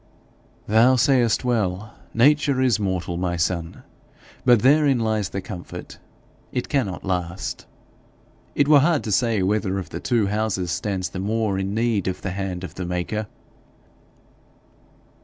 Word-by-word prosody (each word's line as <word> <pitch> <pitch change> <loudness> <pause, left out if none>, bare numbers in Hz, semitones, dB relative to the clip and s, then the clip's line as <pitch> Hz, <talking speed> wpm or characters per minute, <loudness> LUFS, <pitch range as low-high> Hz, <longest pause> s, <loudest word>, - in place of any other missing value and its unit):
'Thou 115 +5 +5
sayest 125 -2 +2
well; 105 -3 -1 0.2
nature 145 +2 +3
is 125 -5 +2
mortal, 90 -3 -2
my 90 -1 -1
son. 85 0 -2 0.6
But 120 -3 +4
therein 140 0 +4
lies 110 -4 0
the 100 - -4
comfort 90 -2 -9 0.5
it 125 - -3
cannot 120 -10 -1
last. 90 -1 -3 0.9
It 145 - +3
were 150 -1 +7
hard 155 +1 +2
to 110 - -3
say 115 -2 +2
whether 100 0 0
of 95 - -6
the - - -5
two 115 -4 +1
houses 100 -3 -1
stands 95 +1 -2
the 95 - -6
more 105 0 -1
in 95 +1 -2
need 115 -4 0
of 95 - -3
the 95 - -2
hand 95 -1 -4
of 95 - -7
the 90 - -5
maker.' 90 +5 -3
105 Hz, 145 wpm, -23 LUFS, 95-120 Hz, 0.9 s, were